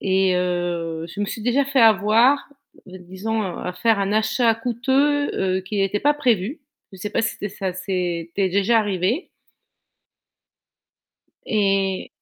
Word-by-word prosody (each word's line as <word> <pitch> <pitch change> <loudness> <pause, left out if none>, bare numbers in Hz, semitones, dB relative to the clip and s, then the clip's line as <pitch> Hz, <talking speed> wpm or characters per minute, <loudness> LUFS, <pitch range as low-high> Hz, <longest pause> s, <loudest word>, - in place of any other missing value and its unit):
Et 190 -1 +2
heu, 175 -2 -2
je 205 - -6
me - - +1
suis 220 - -6
déjà 245 +5 +2
fait 275 -1 +1
avoir, 225 +6 +4 0.4
d 185 0 -11
disons 190 +5 -4
à 180 -1 -4
faire 225 +3 +1
un 200 0 -1
achat 220 +2 +2
coûteux, 265 +5 0 0.3
heu, - - -4
qui 200 +2 -3
était 195 +1 0
pas 295 +1 +3
prévu. 245 - 0 0.3
Je 190 - -12
sais 210 +2 -5
pas 225 - 0
si - - -2
tu - - -7
es - - -4
si - - -15
ça 190 -2 -2
s'est 180 -2 -3
ça - - -37
t'es 195 -1 +1
déjà 200 +5 +2
arrivé? 205 - -1 2.2
Et 195 -3 0
205 Hz, 165 wpm, -22 LUFS, 185-230 Hz, 2.2 s, avoir